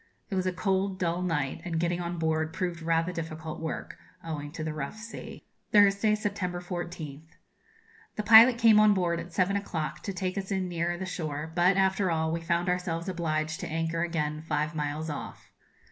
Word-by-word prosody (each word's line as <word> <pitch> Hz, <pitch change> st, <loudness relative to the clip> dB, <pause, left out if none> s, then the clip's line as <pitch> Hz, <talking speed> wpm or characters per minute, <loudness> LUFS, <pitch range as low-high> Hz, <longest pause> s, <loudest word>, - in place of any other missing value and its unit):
It -, -, -1 dB
was 185 Hz, 0 st, 0 dB
a -, -, +2 dB
cold, 190 Hz, +1 st, 0 dB
dull 175 Hz, -1 st, -1 dB
night, 150 Hz, -7 st, -1 dB
and 165 Hz, -2 st, -2 dB
getting 175 Hz, +1 st, 0 dB
on 175 Hz, 0 st, -3 dB
board 160 Hz, 0 st, 0 dB
proved 175 Hz, -2 st, -3 dB
rather 165 Hz, +1 st, +1 dB
difficult 160 Hz, -2 st, -5 dB
work, 160 Hz, -1 st, -5 dB, 0.2 s
owing 150 Hz, -3 st, -5 dB
to 155 Hz, -, -5 dB
the 155 Hz, -1 st, -3 dB
rough 150 Hz, +7 st, -5 dB
sea. 225 Hz, +1 st, -9 dB, 0.3 s
Thursday, 205 Hz, 0 st, +5 dB
September 200 Hz, -4 st, -2 dB
14th. 170 Hz, -4 st, -7 dB, 0.8 s
The 210 Hz, -, -2 dB
pilot 225 Hz, +3 st, +9 dB
came 225 Hz, -2 st, +6 dB
on 215 Hz, -1 st, +6 dB
board 170 Hz, -3 st, +1 dB
at 170 Hz, +1 st, -8 dB
seven 190 Hz, +1 st, +1 dB
o'clock 160 Hz, -6 st, -3 dB
to -, -, -4 dB
take 185 Hz, +1 st, -2 dB
us 190 Hz, -, -6 dB
in 190 Hz, -2 st, -1 dB
nearer 175 Hz, 0 st, -1 dB
the 190 Hz, -, -4 dB
shore, 160 Hz, -3 st, -4 dB
but, 180 Hz, +3 st, +4 dB
after 190 Hz, 0 st, +2 dB
all, 160 Hz, -1 st, 0 dB
we 165 Hz, 0 st, -2 dB
found 170 Hz, +2 st, 0 dB
ourselves 180 Hz, -1 st, -1 dB
obliged 155 Hz, -3 st, -1 dB
to -, -, -4 dB
anchor 165 Hz, +1 st, -1 dB
again 155 Hz, -3 st, -1 dB
five 155 Hz, 0 st, -1 dB
miles 150 Hz, 0 st, -3 dB
off. 145 Hz, -, -8 dB
170 Hz, 190 wpm, -28 LUFS, 160-190 Hz, 0.8 s, pilot